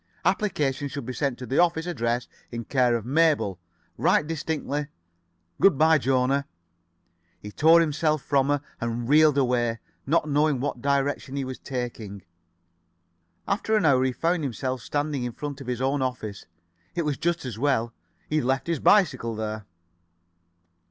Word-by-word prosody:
Applications 145 -8 0
should 140 -3 -5
be 130 - -5
sent 135 -2 -1
to 125 - -7
the 135 - 0
office 170 -2 +2
address 120 -7 -1 0.2
in 115 -1 -5
care 125 -3 +2
of 115 -2 -3
Mabel. 140 - +2 0.4
Write - - +3
distinctly. 150 -2 -3 0.7
Good 195 -8 +5
by, 160 +1 +5
Jona." 135 +1 +1 0.9
He 105 - -9
tore 160 +7 +5
himself 155 -1 0
from 140 -2 +2
her, 145 -1 +1 0.2
and 115 0 -3
reeled 150 +1 +5
away, 120 -3 +1 0.3
not 155 +1 +2
knowing 150 -1 +2
what 130 -2 -3
direction 140 -1 0
he 140 -1 -2
was 130 0 -6
taking. 115 -6 -5 1.2
After 215 +2 0
an 205 - +1
hour 130 -3 +4
he 130 - +1
found 165 +5 0
himself 130 -1 -3
standing 145 -2 -2
in 120 -1 -4
front 145 +1 -6
[Pg 135 - -9
65]of - - -6
his 125 0 -2
own 135 +1 +1
office. 125 -6 -4 0.5
It 170 - -1
was 145 -3 -2
just 170 -3 -1
as 115 -4 -6
well. 120 -4 +1 0.3
He 155 - 0
had 150 - 0
left 135 +1 0
his 170 -3 -1
bicycle 145 - +3
there. 110 -1 -5
135 Hz, 165 wpm, -25 LUFS, 125-155 Hz, 1.2 s, Good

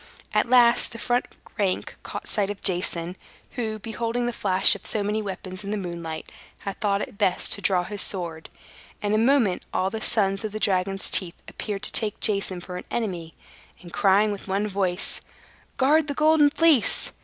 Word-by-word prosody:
At - - +1
last, 240 -1 +4
the - - -7
front 245 +1 0 0.3
rank 190 -3 -1
caught - - -7
sight 200 -2 0
of 205 -1 -7
Jason, 175 -2 0 0.4
who, 220 -3 -3
beholding 230 +2 -3
the 240 - -2
flash 190 -3 +5
of - - -8
so 210 - -1
many 210 +2 -1
weapons 190 -1 -6
in 200 - -6
the 210 - -1
moonlight, 170 -4 -6 0.3
had 200 +2 -6
thought 205 -1 +1
it 200 - -10
best 195 -3 +1
to 200 - -1
draw 185 -2 +2
his 205 +2 -4
sword. 170 -4 -4 0.5
In 205 0 0
a 215 - +3
moment 230 -5 +3
all 190 +1 0
the 220 - -5
sons 195 -4 +1
of 215 -1 -4
the 215 - -4
dragon's 195 -1 0
teeth 175 -3 +2
appeared 205 -2 -5
to - - -1
take 215 -3 +1
Jason 195 -4 +2
for 180 0 -7
an - - -8
enemy; 180 -8 -4 0.5
and 175 - -12
crying 205 +2 +3
with 200 -1 -7
one 200 +2 -1
voice, 190 -2 0 0.6
"Guard 300 +3 +3
the 285 - -3
Golden 305 -1 +4
Fleece!" 310 -6 +3
200 Hz, 190 wpm, -24 LUFS, 185-225 Hz, 0.6 s, flash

